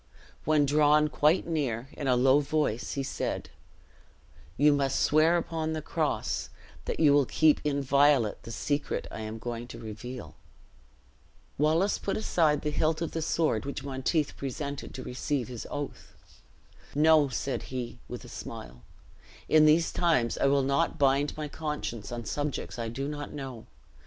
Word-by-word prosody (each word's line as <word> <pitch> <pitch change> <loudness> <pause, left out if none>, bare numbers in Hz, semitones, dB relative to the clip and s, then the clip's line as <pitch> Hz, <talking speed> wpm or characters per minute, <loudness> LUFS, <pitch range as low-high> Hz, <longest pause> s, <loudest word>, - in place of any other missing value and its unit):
When 150 -1 +4
drawn 150 +1 +4
quite 155 +5 +3
near, 135 -7 -2
in 145 - -4
a 125 - +4
low 130 +3 +5
voice 145 -6 -1
he 140 - -2
said, - - -3 1.1
"You 145 +2 +5
must 140 -1 +1
swear 160 +3 +4
upon 160 -1 -2
the 155 - -3
cross - - -1 0.4
that - - -3
you 150 -3 +6
will 145 -3 +4
keep 155 -2 +3
inviolate 140 -4 +3
the 115 - -9
secret 145 +5 -2
I - - -6
am 110 0 -5
going 120 +1 -5
to 115 - -9
reveal." 115 +3 -8 1.3
Wallace 160 +7 +2
put 195 - -2
aside 160 -8 +2
the 150 - -1
hilt 155 +1 +1
of 165 - -3
the 165 - -3
sword 155 -8 +1
which 140 - -5
Monteith 140 +2 -1
presented 140 +1 -5
to 130 - -6
receive 130 0 -2
his 120 -3 -7
oath. 145 -1 -6 0.8
"No," 155 0 +5
said 135 +1 -2
he, 125 -2 -5
with - - -7
a - - -10
smile; 60 0 -8 0.7
"in 155 -1 +6
these 160 +2 +4
times 160 -10 +2
I - - +3
will 140 0 +3
not 140 +5 +1
bind 140 +1 +2
my 155 -1 -3
conscience 150 -8 -5
on 120 -1 -5
subjects 145 -3 -3
I 115 - -2
do 135 +4 -4
not 145 -1 -5
know. 135 -5 -7
145 Hz, 160 wpm, -29 LUFS, 130-155 Hz, 1.3 s, you